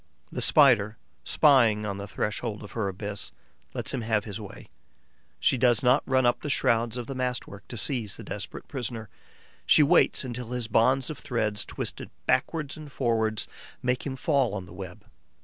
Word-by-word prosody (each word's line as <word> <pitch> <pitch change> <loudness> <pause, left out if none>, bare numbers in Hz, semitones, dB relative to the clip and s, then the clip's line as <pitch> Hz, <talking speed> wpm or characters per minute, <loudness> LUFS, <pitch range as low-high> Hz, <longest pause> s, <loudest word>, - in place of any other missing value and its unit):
The - - -3
Spider, 105 +2 +5 0.3
spying 115 -8 +4
on 100 -1 -3
the 100 0 -6
threshold 105 +2 -3
of 105 - -10
her 110 -4 -1
abyss, 100 +2 -4 0.4
lets - - -1
him 130 - -1
have 110 -2 0
his 105 +1 -6
way. 100 -1 -10 0.7
She 130 - +2
does 120 -2 +3
not 125 +3 +5
run 130 -1 +3
up 120 - +2
the 150 - -4
shrouds 115 -3 +1
of 120 - -4
the 135 - -5
mast 125 -1 -1
work 100 0 -12
to 120 - -7
seize 115 -4 0
the 115 - -9
desperate 100 -1 -6
prisoner; 120 -5 -4 0.5
she 155 - +6
waits 165 0 +4
until 125 -1 -5
his 125 -2 -2
bonds 130 +5 +3
of 150 - -8
threads, 110 -3 -1
twisted - - -5 0.2
backwards 145 +3 0
and 150 -2 -10
forwards, 110 -5 0 0.4
make 125 0 0
him 135 -2 -4
fall 135 -5 +1
on 95 -3 -5
the 90 - -13
web. 95 +2 -9
115 Hz, 185 wpm, -27 LUFS, 105-130 Hz, 0.7 s, she